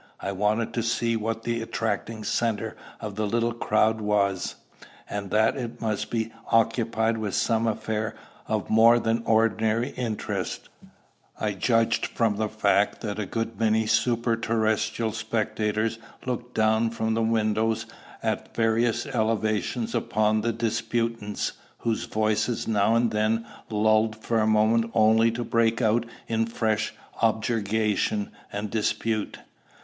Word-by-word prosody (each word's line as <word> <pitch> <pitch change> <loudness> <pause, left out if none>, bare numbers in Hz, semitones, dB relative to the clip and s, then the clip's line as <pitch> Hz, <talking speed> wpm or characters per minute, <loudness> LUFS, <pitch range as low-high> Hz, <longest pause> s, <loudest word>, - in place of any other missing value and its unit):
I 100 - -3
wanted 105 +4 0
to 120 - 0
see 115 0 0
what 115 +1 -2
the 115 -1 -1
attracting 115 -1 -3
centre 110 0 -1 0.2
of 105 -2 -5
the 105 +1 -1
little 115 +2 +1
crowd 110 -1 +2
was; 100 -3 0 0.5
and 100 -1 -4
that 110 +3 +3
it 120 -3 -5
must 110 -3 -2
be 115 -1 -2 0.2
occupied 115 0 +2
with 105 -3 -2
some 115 -1 +1
affair 110 0 -2 0.3
of - - -1
more 115 +2 +6
than 115 0 0
ordinary 110 +2 +2
interest, 115 -4 -4 0.7
I 105 - 0
judged 115 +3 +1
from 110 -3 0
the 110 0 0
fact 105 -1 +1
that 105 -2 -4
a 105 - -2
good 115 0 -3
many 110 0 +3
superterrestrial 115 -1 +1
spectators 110 +3 -1 0.3
looked 125 -1 -4
down 110 +1 +3
from 110 -1 -1
the 115 - +1
windows 110 0 +1 0.4
at - - -2
various 115 0 +2
elevations 110 - -1
upon 110 -2 +1
the 115 +2 0
disputants, 115 -1 -1 0.3
whose 115 -1 -1
voices 110 +2 0
now 110 0 +3
and 115 0 +2
then 110 +2 +1 0.2
lulled 110 0 +2
for 115 +1 -1
a 110 - +2
moment 110 +2 +3
only 110 +1 +5
to 120 +1 -3
break 115 -1 +2
out 115 0 +2 0.2
in 115 0 0
fresh 110 -2 0 0.3
objurgation 110 -2 +1 0.2
and 105 0 -4
dispute. 110 -1 -1
110 Hz, 135 wpm, -26 LUFS, 110-115 Hz, 0.7 s, more